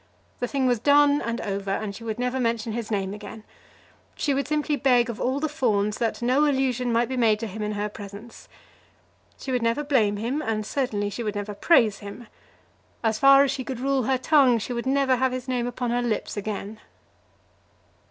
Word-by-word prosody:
The 245 - -1
thing 275 0 -1
was 245 -3 +2
done 285 +3 +4
and 230 0 -3
over, 200 -1 -4
and 200 +1 -2
she 230 - -10
would 220 -1 -4
never 250 +1 -1
mention 230 -2 -1
his 230 -1 -4
name 195 -3 -2
again. 210 +1 -9 0.7
She 285 - 0
would 275 0 -1
simply 300 0 0
beg 245 -3 +3
of 230 - -9
all 260 +3 0
the 310 - 0
Fawns 210 -9 0
that 235 0 -2
no 260 +5 +3
allusion 255 -3 0
might 235 +1 +2
be 260 - -4
made 220 -3 +3
to 230 - -4
him 215 0 -7
in 210 0 -2
her 205 0 -2
presence. 205 +2 -11 0.9
She 265 - -6
would 250 -1 0
never 230 +6 0
blame 225 -8 +2
him, 245 +8 -2
and 215 -6 -2
certainly 210 -6 -2
she 220 - -5
would 215 -2 -3
never 205 0 -4
praise 215 - +3
him. 205 +4 -9 0.8
As 220 -1 0
far 275 +1 +7
as 280 - +1
she 270 -1 -4
could 255 -2 -5
rule 270 -1 0
her 265 +1 +2
tongue, 260 -2 +4
she 230 +3 -4
would 235 +1 -4
never 270 -1 +2
have 260 0 +1
his 255 0 -5
name 245 -2 -1
upon 245 0 -3
her 245 +1 +1
lips 235 -3 -2
again. 210 +1 -5
240 Hz, 210 wpm, -25 LUFS, 215-265 Hz, 0.9 s, far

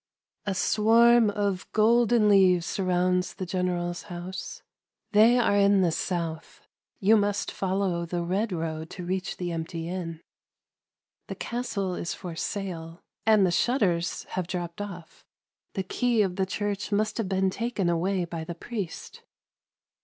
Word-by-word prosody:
A 195 - 0
swarm 230 +3 +5
of 200 -2 -2
golden 230 0 +4
leaves 185 -4 +5
surrounds 180 -1 0
the 185 - -4
general's 180 -1 -2
house 180 +1 -7 0.5
They 220 +4 +6
are 230 -4 +3
in 200 -1 +4
the 175 -3 +3
south. 165 -1 -3 0.2
— - - -50
You 215 +1 +5
must 205 -1 0
follow 185 -3 -1
the 175 0 -2
red 195 +5 -1
road 160 -2 -3
to 180 - -7
reach 185 +1 -3
the 175 -1 -3
empty 165 0 -4
inn. 170 -2 -5 1.1
The - - -5
castle 215 -6 -3
is 170 - -3
for 175 -3 -7
sale, 170 -3 -5 0.2
and 215 -3 +6
the 180 - +2
shutters 175 -5 +1
have 185 -2 -3
dropped 175 0 -4
off. 180 -5 -9 0.2
— - - -57
The 190 - -1
key 235 +3 +1
of 185 -2 -2
the 190 0 0
church 205 +1 -3
must 215 +2 0
have 205 -5 -1
been 190 0 +1
taken 230 -4 -2
away 175 +2 +1
by 165 -1 -5
the 170 +1 -6
priest. 200 -2 -6
185 Hz, 155 wpm, -27 LUFS, 175-205 Hz, 1.1 s, They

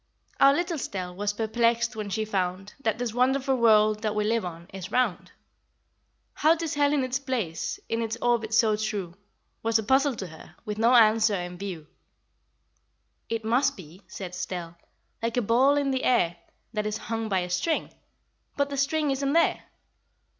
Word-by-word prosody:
Our 275 - +7
little 340 +3 -1
Estelle 185 -8 -5
Was 205 +2 -1
perplexed 230 +2 +1
when 210 -2 -4
she 215 +2 -1
found 190 -1 -2
That 220 -5 -1
this 240 -2 -3
wonderful 265 +2 +2
world 215 -2 +4
That 215 -1 -1
we 210 - +1
live 225 +2 +1
on 170 -1 -7
is 185 -1 -7
round. 250 -7 0 1.0
How 315 +2 +4
'tis 330 -2 -3
held 285 0 +2
in 285 -3 +2
its 255 +1 -1
place 235 - -3
In 230 0 -1
its 225 0 -3
orbit 235 -2 +1
so 220 -1 +4
true 210 -5 -3 0.5
Was 225 0 +2
a 220 - -2
puzzle 265 +4 +3
to 195 - -5
her, 160 -2 -13
With 210 -1 -4
no 235 +3 +5
answer 220 -2 +5
in 180 -1 -5
view. 180 -4 -6 1.4
"It 225 -1 -3
must 255 +4 +2
be," 180 +1 -13
said 185 -3 -7
Estelle, 180 -2 -5 0.5
"Like 230 +1 -2
a - - +3
ball 260 +7 +4
in 280 -1 +1
the 260 -1 -1
air 175 -9 +2 0.4
That 210 -1 -1
is 215 0 -2
hung 225 0 -4
by 190 -2 +1
a 180 - -4
string; 310 - -1 0.6
But 285 0 0
the 280 - -3
string 290 +1 +1
isn't 275 +1 0
there!" 335 0 +2
225 Hz, 180 wpm, -26 LUFS, 200-260 Hz, 1.4 s, Our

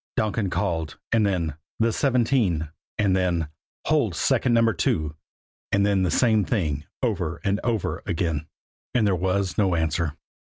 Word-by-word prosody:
"CS - - -80
CS - - -122
CS," - - +4
Donkin 105 -2 -1
called; 80 -3 -2
and 115 -2 +3
then, 85 -6 -1 0.2
"the 115 0 +2
seventeen," 120 - +1 0.3
and 100 -4 +3
then, 85 -4 0 0.4
"hold 135 - +2
second 125 +9 +2
Number 115 -1 +4
Two." 75 -3 0 0.6
And 100 0 +3
then 100 -2 +2
the 90 - +2
same 110 0 +3
thing 75 - -1 0.2
over 95 -9 -1
and 100 -1 +1
over 115 -5 -1
again. 80 -2 -1 0.5
And 115 -3 +4
there 100 -2 +3
was 95 +2 0
no 95 -4 +3
answer. 80 -1 0
95 Hz, 165 wpm, -25 LUFS, 85-110 Hz, 0.6 s, CS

